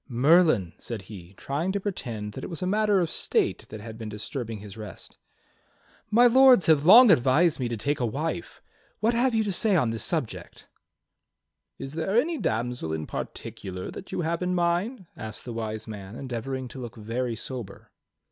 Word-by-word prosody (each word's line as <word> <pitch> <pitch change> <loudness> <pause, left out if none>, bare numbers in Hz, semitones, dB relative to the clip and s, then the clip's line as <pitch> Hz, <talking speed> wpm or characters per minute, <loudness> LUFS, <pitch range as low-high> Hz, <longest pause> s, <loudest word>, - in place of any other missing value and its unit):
"Merlin," 135 - +4
said 115 -5 -6
he, 95 -2 -11
trying 155 +7 -2
to 200 - 0
pretend 120 - -4
that - - -7
it - - -5
was 170 0 -5
a - - 0
matter 210 +1 +2
of 170 - +1
state - - 0
that 110 -1 -8
had 110 +1 -9
been 110 -1 -5
disturbing 110 +2 -5
his 100 0 -10
rest. 105 -3 -10 0.9
"My 235 +3 +5
Lords 255 -3 +7
have 155 -1 +4
long 230 +3 +10
advised 150 +3 +3
me 125 - -1
to 115 -1 -3
take 145 +7 -1
a 125 - +1
wife. 150 +9 -4 0.4
What 225 +2 +2
have 240 +1 +2
you 220 - +3
to 205 - -1
say 200 +2 +2
on 125 -10 +2
this 115 - -3
subject.^" 155 -10 -4 1.1
"Is 135 - -7
there 180 +8 +1
any 320 +4 -1
damsel 115 -6 -2
in 80 -1 -3
particular 95 -1 -6
that - - -10
you - - -2
have 170 +1 -1
in 180 0 0
mind.^" 180 +6 0
asked 110 -1 -7
the 120 - -5
Wise 110 -1 -4
Man, 100 -1 -8
endeavoring 130 +1 -4
to 130 - -9
look 120 -2 -7
very 115 +2 -3
sober. 115 -3 -7
130 Hz, 185 wpm, -26 LUFS, 110-180 Hz, 1.1 s, long